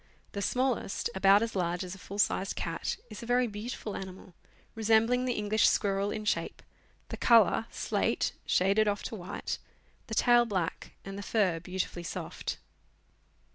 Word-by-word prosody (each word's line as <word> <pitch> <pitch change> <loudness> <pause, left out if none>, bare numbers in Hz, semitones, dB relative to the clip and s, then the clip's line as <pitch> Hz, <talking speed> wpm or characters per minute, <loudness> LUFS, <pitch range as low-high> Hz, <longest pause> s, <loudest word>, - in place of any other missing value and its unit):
The 200 - -4
smallest, 250 -2 0
about 195 +2 +5
as 230 -2 -4
large 175 -1 0
as 180 -1 -6
a 195 - -10
full 200 +2 -8
sized 195 -1 +1
cat, - - -3
is - - -8
a 235 - -8
very 245 +1 +3
beautiful 215 0 -5
animal, 190 -1 -8 0.4
resembling 225 +3 +3
the 250 - +1
English 210 +1 +3
squirrel 200 -1 +1
in 215 0 -4
shape; - - -1 0.5
the - - -5
colour, 225 -1 +5
slate - - 0 0.2
shaded 200 +4 +3
off 205 0 0
to 230 - -5
white; 180 -2 -5 0.5
the 220 - -4
tail 240 0 +5
black, 185 -6 -3
and 195 +1 -6
the - - -4
fur 195 -5 +1
beautifully 180 0 -4
soft. 170 - -5
205 Hz, 160 wpm, -30 LUFS, 190-225 Hz, 0.5 s, about